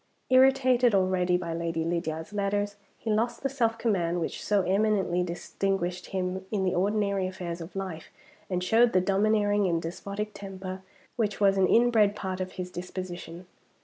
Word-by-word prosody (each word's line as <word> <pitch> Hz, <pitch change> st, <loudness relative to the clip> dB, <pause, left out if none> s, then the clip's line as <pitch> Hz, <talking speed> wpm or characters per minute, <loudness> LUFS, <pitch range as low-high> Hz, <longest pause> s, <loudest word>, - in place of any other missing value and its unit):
Irritated 255 Hz, -3 st, +5 dB
already 185 Hz, -1 st, +2 dB
by 170 Hz, -2 st, -4 dB
Lady 165 Hz, -1 st, -2 dB
Lydiard's 165 Hz, +1 st, -3 dB
letters, 205 Hz, 0 st, -1 dB, 0.2 s
he 225 Hz, -, -3 dB
lost 230 Hz, +4 st, 0 dB
the 275 Hz, -, +1 dB
self 230 Hz, -4 st, 0 dB
command 180 Hz, -7 st, 0 dB
which 165 Hz, -, -4 dB
so 205 Hz, -2 st, +2 dB
eminently 195 Hz, -2 st, +1 dB
distinguished 180 Hz, +1 st, -2 dB
him 185 Hz, 0 st, -3 dB
in 205 Hz, -3 st, 0 dB
the 185 Hz, -, +1 dB
ordinary 200 Hz, 0 st, +1 dB
affairs 175 Hz, -2 st, -5 dB
of 165 Hz, +4 st, -9 dB
life, 185 Hz, -5 st, -5 dB, 0.4 s
and 180 Hz, -1 st, -1 dB
showed 230 Hz, +5 st, +4 dB
the 185 Hz, -, +5 dB
domineering 205 Hz, +1 st, +2 dB
and 170 Hz, -2 st, +1 dB
despotic 200 Hz, +5 st, -5 dB
temper 190 Hz, -2 st, -7 dB, 0.4 s
which 210 Hz, -4 st, -1 dB
was 195 Hz, -1 st, +4 dB
an 190 Hz, -1 st, +3 dB
inbred 225 Hz, -3 st, +4 dB
part 190 Hz, -2 st, -4 dB
of 185 Hz, -, -4 dB
his 180 Hz, -1 st, -6 dB
disposition. 180 Hz, -1 st, -7 dB
190 Hz, 160 wpm, -28 LUFS, 180-210 Hz, 0.4 s, Irritated